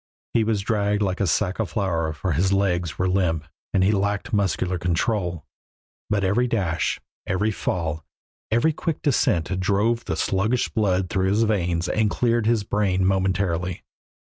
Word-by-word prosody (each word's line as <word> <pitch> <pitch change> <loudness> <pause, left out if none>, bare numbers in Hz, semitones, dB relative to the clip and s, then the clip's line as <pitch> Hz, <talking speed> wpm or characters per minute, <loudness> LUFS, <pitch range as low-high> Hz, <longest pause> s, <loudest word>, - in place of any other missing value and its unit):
He 115 - +3
was 110 -2 0
dragged 105 0 0
like 95 -1 -1
a 100 - +2
sack 95 +4 0
of 110 - -1
flour 85 -6 -1
for 90 +4 -3
his 90 +6 +1
legs 90 -4 0
were 95 - +1
limp 90 -4 +1 0.3
and 95 - +2
he 95 - +4
lacked 100 +4 -1
muscular 95 -3 0
control, 90 - -1 0.6
but 105 -2 +1
every 105 +7 +2
dash, 95 -9 0 0.3
every 105 +4 +1
fall, 80 -6 -2 0.5
every 120 +8 +2
quick 160 0 -3
descent 90 - +1
drove 105 +5 +1
the - - -2
sluggish 110 +5 +1
blood 95 -4 0
through 95 0 +1
his 105 +3 +3
veins 90 -5 0
and 110 +2 +1
cleared 115 -1 +1
his 115 -3 +2
brain 95 -2 +1
momentarily. 95 -2 0
95 Hz, 160 wpm, -24 LUFS, 90-105 Hz, 0.6 s, he